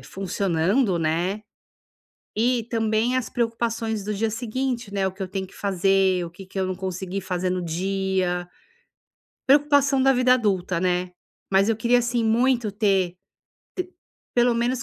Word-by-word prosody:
funcionando, 190 Hz, +2 st, 0 dB
né, 170 Hz, +6 st, -1 dB, 0.9 s
e 235 Hz, +1 st, +1 dB
também 225 Hz, +1 st, 0 dB
as 255 Hz, -3 st, -1 dB
preocupações 230 Hz, -2 st, -1 dB
do 210 Hz, -, -2 dB
dia 220 Hz, +2 st, -1 dB
seguinte, 240 Hz, 0 st, -3 dB
né, 195 Hz, -1 st, 0 dB
o 190 Hz, -, -2 dB
que 195 Hz, -, -7 dB
eu 185 Hz, -, -4 dB
tenho 190 Hz, 0 st, -4 dB
que -, -, -19 dB
fazer, 195 Hz, -1 st, +2 dB
o 165 Hz, -, -9 dB
que 185 Hz, +3 st, -12 dB
que 190 Hz, +1 st, -8 dB
eu 190 Hz, -, +1 dB
não 185 Hz, -, -2 dB
consegui 190 Hz, +1 st, -4 dB
fazer 185 Hz, -1 st, -2 dB
no 180 Hz, 0 st, -1 dB
dia. 185 Hz, 0 st, -1 dB, 1.0 s
Preocupação 280 Hz, -1 st, +4 dB
da 270 Hz, 0 st, +5 dB
vida 250 Hz, 0 st, +4 dB
adulta, 190 Hz, -7 st, 0 dB
né, 180 Hz, 0 st, 0 dB, 0.4 s
mas 195 Hz, +2 st, +4 dB
eu 225 Hz, -, +2 dB
queria 240 Hz, +2 st, +3 dB
assim 240 Hz, 0 st, 0 dB
muito 235 Hz, 0 st, +2 dB
ter 195 Hz, -3 st, +1 dB
te -, -, -35 dB, 1.2 s
pelo 240 Hz, 0 st, +4 dB
menos 245 Hz, +2 st, 0 dB
200 Hz, 160 wpm, -24 LUFS, 185-235 Hz, 1.2 s, da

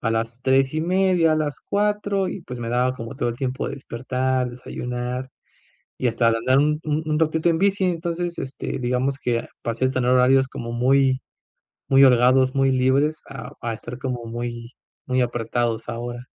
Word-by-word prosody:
a 115 Hz, -, 0 dB
las 115 Hz, +2 st, -2 dB
3 135 Hz, +2 st, +3 dB
y 155 Hz, -, 0 dB
media, 180 Hz, -1 st, +3 dB
a 155 Hz, -, +2 dB
las 150 Hz, -3 st, -2 dB
4 205 Hz, -2 st, 0 dB
y 195 Hz, -, -5 dB
pues 125 Hz, -4 st, -7 dB
me 115 Hz, -1 st, -4 dB
daba 125 Hz, +2 st, +1 dB
como 115 Hz, -2 st, -7 dB
todo 120 Hz, -, -1 dB
el 115 Hz, -, -7 dB
tiempo 130 Hz, 0 st, -2 dB
de -, -, -4 dB
despertar, 130 Hz, 0 st, -2 dB
desayunar 125 Hz, +1 st, -5 dB, 0.7 s
y 125 Hz, -, 0 dB
hasta 115 Hz, 0 st, +2 dB
de 115 Hz, -, +1 dB
andar 130 Hz, +3 st, +2 dB
un 150 Hz, +1 st, +2 dB
un 155 Hz, 0 st, 0 dB
un 150 Hz, -, +1 dB
ratito 160 Hz, +1 st, +2 dB
en 165 Hz, -, +2 dB
bici. 195 Hz, +1 st, +2 dB
Entonces 170 Hz, 0 st, -2 dB
este 130 Hz, -, -4 dB
digamos 125 Hz, +2 st, 0 dB
que 120 Hz, -3 st, -1 dB, 0.2 s
pasé 115 Hz, +2 st, -1 dB
a 130 Hz, -, +1 dB
tener 125 Hz, -1 st, 0 dB
horarios 130 Hz, +1 st, +4 dB
como 115 Hz, -2 st, -6 dB
muy 130 Hz, +2 st, +3 dB, 0.7 s
muy 135 Hz, 0 st, +6 dB
holgados, 130 Hz, +1 st, +5 dB
muy 135 Hz, 0 st, +3 dB
libres 135 Hz, +4 st, +2 dB
a 125 Hz, +4 st, -8 dB
a 115 Hz, -1 st, -2 dB
estar 120 Hz, +3 st, -8 dB
como 125 Hz, -2 st, -4 dB
muy, 120 Hz, +1 st, -5 dB, 0.3 s
muy 130 Hz, 0 st, +1 dB
apretados 120 Hz, -1 st, -1 dB
ahora. 120 Hz, +1 st, -5 dB
130 Hz, 185 wpm, -23 LUFS, 120-150 Hz, 0.7 s, muy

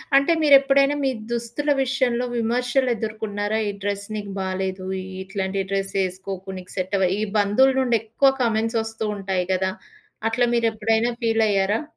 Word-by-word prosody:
అంటే 275 Hz, +4 st, +5 dB
మీరు 290 Hz, -2 st, +7 dB
ఎప్పుడైనా 275 Hz, +1 st, +3 dB
మీ -, -, +3 dB, 0.2 s
దుస్తుల 240 Hz, +5 st, -1 dB
విషయంలో 250 Hz, -2 st, 0 dB
విమర్శలేదుర్కొన్నార? 225 Hz, -3 st, -1 dB, 0.2 s
"ఈ -, -, -1 dB
డ్రెస్ 200 Hz, 0 st, -2 dB
నీకు 205 Hz, -1 st, -5 dB
బాలేదు 190 Hz, 0 st, -3 dB, 0.2 s
ఈ -, -, -7 dB, 0.2 s
ఇట్లాంటి 195 Hz, 0 st, -2 dB
డ్రెస్ 195 Hz, 0 st, -1 dB
ఏసుకోకు 190 Hz, +1 st, -6 dB
నీకు 185 Hz, -, -12 dB
సెట్ 185 Hz, +2 st, -1 dB
అవ" 185 Hz, -2 st, +3 dB
ఈ -, -, -1 dB, 0.2 s
బంధువులునుండి 255 Hz, +4 st, +3 dB
ఎక్కువ 230 Hz, +5 st, +3 dB
కామెంట్స్ 225 Hz, -1 st, +1 dB
ఒస్తూ 225 Hz, 0 st, -4 dB
ఉంటాయి 190 Hz, -2 st, -1 dB
కదా! 190 Hz, 0 st, 0 dB, 0.6 s
అట్లా 245 Hz, +2 st, +1 dB
మీరేప్పుడైనా 225 Hz, 0 st, +1 dB
ఫీలయ్యారా? 215 Hz, -1 st, +2 dB
220 Hz, 140 wpm, -23 LUFS, 195-245 Hz, 0.6 s, మీరు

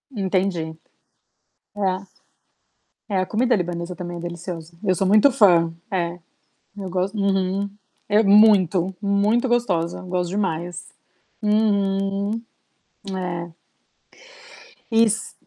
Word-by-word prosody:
Entendi 185 Hz, -5 st, -1 dB, 1.0 s
é. 190 Hz, -1 st, -1 dB, 1.0 s
É, 195 Hz, -2 st, +1 dB
a 185 Hz, -, 0 dB
comida 240 Hz, +4 st, +1 dB
libanesa 175 Hz, -1 st, -3 dB
também 175 Hz, -2 st, -6 dB
é -, -, -6 dB
deliciosa, 170 Hz, -1 st, -7 dB
eu 185 Hz, -3 st, +2 dB
sou 190 Hz, +2 st, 0 dB
muito 215 Hz, +8 st, +6 dB
fã, 170 Hz, -8 st, +4 dB, 0.2 s
é, 175 Hz, -2 st, -2 dB, 0.6 s
eu 195 Hz, -2 st, -5 dB
gos 185 Hz, +1 st, -1 dB
uhum 195 Hz, -1 st, 0 dB, 0.4 s
é 210 Hz, +1 st, +4 dB
muito, 195 Hz, -3 st, +5 dB
muito 205 Hz, +5 st, +2 dB
gostosa, 185 Hz, -9 st, 0 dB
eu -, -, -10 dB
gosto 180 Hz, -1 st, -2 dB
demais, 175 Hz, -3 st, -3 dB, 0.5 s
uhum, 200 Hz, -1 st, +1 dB, 0.8 s
é. 170 Hz, -2 st, -4 dB, 1.4 s
Iss 225 Hz, -1 st, +2 dB
190 Hz, 105 wpm, -22 LUFS, 175-205 Hz, 1.4 s, muito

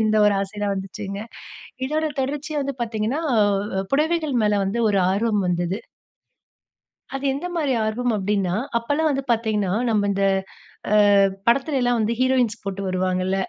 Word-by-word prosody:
இந்த 215 Hz, 0 st, +2 dB
ஒரு 205 Hz, -, +4 dB
ஆசைலாம் 200 Hz, 0 st, -2 dB
வந்துச்சுங்க. 195 Hz, +1 st, -6 dB, 0.7 s
இதோட 310 Hz, +1 st, 0 dB
தொடர்ச்சியா 290 Hz, +2 st, -2 dB
வந்து 275 Hz, 0 st, -3 dB
பார்த்தீங்கன்னா, 225 Hz, +4 st, -2 dB, 0.2 s
அ 200 Hz, -1 st, +1 dB
புடவைகள் 310 Hz, 0 st, +1 dB
மேலே 210 Hz, -, +2 dB
வந்து 205 Hz, +5 st, -1 dB
ஒரு 200 Hz, -, +2 dB
ஆர்வம் 210 Hz, 0 st, +1 dB
வந்தது. 175 Hz, +3 st, -1 dB, 1.4 s
அது 270 Hz, +1 st, -4 dB
எந்தமாரி 325 Hz, -2 st, -2 dB
ஆர்வம் 240 Hz, +2 st, 0 dB
அப்டின்னா, 195 Hz, -2 st, 0 dB, 0.2 s
அப்பல்லாம் 290 Hz, +7 st, 0 dB
வந்து 275 Hz, -1 st, -1 dB
பார்த்தீங்கன்னா, 215 Hz, -4 st, 0 dB, 0.2 s
நம்ம 205 Hz, -2 st, +1 dB
இந்த 195 Hz, 0 st, 0 dB, 0.7 s
அ 210 Hz, -, +4 dB, 0.5 s
படத்தில 270 Hz, +4 st, +2 dB
எல்லாம் 245 Hz, -1 st, +2 dB
வந்து 220 Hz, +2 st, +1 dB
ஹீரோயின்ஸ் 255 Hz, -4 st, +2 dB
போட்டு 195 Hz, 0 st, -4 dB
வருவாங்கல்ல. 185 Hz, +1 st, 0 dB
215 Hz, 140 wpm, -23 LUFS, 200-270 Hz, 1.4 s, ஒரு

